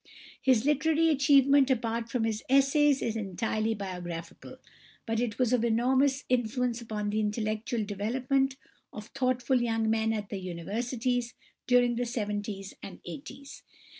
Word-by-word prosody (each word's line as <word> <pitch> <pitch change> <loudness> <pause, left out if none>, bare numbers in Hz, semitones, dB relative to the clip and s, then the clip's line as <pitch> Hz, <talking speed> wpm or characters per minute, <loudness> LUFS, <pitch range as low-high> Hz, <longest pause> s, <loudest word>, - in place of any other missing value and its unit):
His 255 -3 +3
literary 315 +2 +3
achievement, 280 -1 +5
apart 230 -2 -1
from 235 -1 -1
his 220 -1 -2
essays, 275 +1 +4
is 230 - -1
entirely 220 +2 -1
biographical, 175 -4 -7 0.5
but 225 0 -1
it 230 -4 -2
was 250 -1 +1
of 240 -2 +2
enormous 260 +4 +2
influence 245 0 0
upon 210 -2 -3
the 215 - 0
intellectual 215 +1 -1
development 250 +7 0 0.4
of 210 +1 -9
thoughtful 255 -1 +1
young 225 -2 0
men 220 0 +1
at 210 -2 -3
the 200 - -4
Universities 235 +7 -3 0.3
during 245 -1 +3
the 245 0 -1
seventies 205 -4 -4
and 195 - -9
eighties. 275 - -9
235 Hz, 135 wpm, -29 LUFS, 215-260 Hz, 0.5 s, achievement